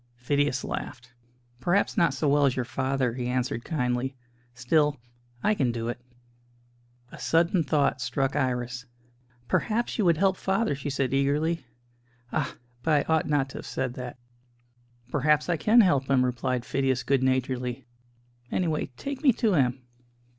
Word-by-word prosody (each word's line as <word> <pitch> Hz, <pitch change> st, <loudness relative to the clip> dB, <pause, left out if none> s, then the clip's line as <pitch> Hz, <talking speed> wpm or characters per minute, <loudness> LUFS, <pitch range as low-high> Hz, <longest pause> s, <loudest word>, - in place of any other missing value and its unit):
Phidias 140 Hz, +2 st, 0 dB
laughed. 120 Hz, 0 st, -6 dB, 0.5 s
"Perhaps 180 Hz, +7 st, +1 dB
not 170 Hz, -, +3 dB
so 145 Hz, +3 st, 0 dB
well 145 Hz, 0 st, +4 dB
as 130 Hz, -, 0 dB
your 125 Hz, -, -1 dB
father," 130 Hz, 0 st, -1 dB
he 125 Hz, 0 st, -3 dB
answered 125 Hz, -2 st, -1 dB
kindly. 130 Hz, -3 st, -1 dB, 0.4 s
"Still, 145 Hz, +4 st, +2 dB, 0.5 s
I 210 Hz, -, +3 dB
can 135 Hz, -, +1 dB
do 115 Hz, 0 st, -3 dB
it." 120 Hz, -, -5 dB, 1.1 s
A -, -, -11 dB
sudden 170 Hz, +2 st, +2 dB
thought 140 Hz, -2 st, +1 dB
struck 130 Hz, +2 st, -1 dB
Iris. 125 Hz, -2 st, -2 dB, 0.6 s
"Perhaps 230 Hz, -, 0 dB
you 210 Hz, -, +3 dB
would 170 Hz, -2 st, +4 dB
help 190 Hz, +1 st, +2 dB
father?" 195 Hz, -1 st, 0 dB
she 140 Hz, +1 st, -4 dB
said 135 Hz, -2 st, -1 dB
eagerly. 145 Hz, +2 st, +1 dB, 0.7 s
"Ah! -, -, -1 dB, 0.3 s
but 150 Hz, 0 st, +2 dB
I 160 Hz, -, +2 dB
ought 160 Hz, -, +1 dB
not 140 Hz, -2 st, +1 dB
to -, -, -8 dB
have -, -, -9 dB
said 130 Hz, -2 st, -2 dB
that." 125 Hz, -1 st, -7 dB, 0.9 s
"Perhaps 150 Hz, +3 st, +2 dB
I 175 Hz, -, +3 dB
can 215 Hz, +9 st, +5 dB
help 140 Hz, -9 st, +2 dB
him," 130 Hz, -2 st, +4 dB
replied 125 Hz, 0 st, -1 dB
Phidias 130 Hz, -2 st, 0 dB
good 135 Hz, -1 st, +2 dB
naturedly. 130 Hz, -1 st, -1 dB, 0.7 s
"Anyway, 160 Hz, -4 st, 0 dB
take 280 Hz, -1 st, -5 dB
me 285 Hz, -4 st, +6 dB
to 220 Hz, -2 st, +1 dB
him." 130 Hz, -4 st, +1 dB
135 Hz, 155 wpm, -27 LUFS, 125-160 Hz, 1.1 s, me